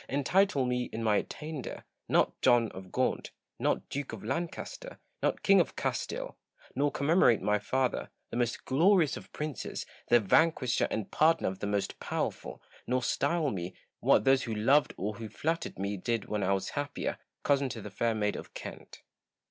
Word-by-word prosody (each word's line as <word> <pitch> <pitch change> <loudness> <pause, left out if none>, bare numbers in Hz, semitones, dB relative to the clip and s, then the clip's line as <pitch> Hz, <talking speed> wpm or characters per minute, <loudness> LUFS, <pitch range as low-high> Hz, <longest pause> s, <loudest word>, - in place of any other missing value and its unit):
Entitle 145 +1 +2
me, 125 0 0
in 115 - -4
my 105 -2 +3
attainder, 155 -3 -5 0.3
not - - +3
John 120 -3 +4
of 95 -1 -10
Gaunt, - - 0 0.3
not - - 0
Duke 145 +1 -4
of - - -7
Lancaster, 175 - -4 0.2
not - - 0
King - - +6
of - - -3
Castile; - - -3 0.4
nor 145 +1 +2
commemorate 145 - +4
my 105 0 +2
father, 130 +4 -1 0.2
the - - -4
most 120 -1 -1
glorious 165 +3 +4
of - - -10
princes, 150 -2 -4 0.2
the 120 - +6
vanquisher 130 +3 +3
and 110 - -3
pardoner 165 -4 +3
of 95 - -7
the 100 - -3
most 100 -1 -1
powerful; - - -3 0.2
nor 125 0 +1
style 160 +4 +1
me, 90 -1 -5 0.2
what - - +4
those 135 +1 +4
who 115 -4 -3
loved 135 +8 +4
or 100 +2 -3
who 110 -2 -6
flattered 165 - -2
me 100 +1 -2
did 115 +3 -1
when 105 -1 -2
I 100 +1 +2
was 95 - -1
happier, 145 0 -3 0.2
cousin 140 -2 +2
to 115 - -6
the 105 - -7
Fair 115 +3 0
Maid 105 -1 0
of - - -9
Kent. - - -9
125 Hz, 175 wpm, -30 LUFS, 105-150 Hz, 0.4 s, King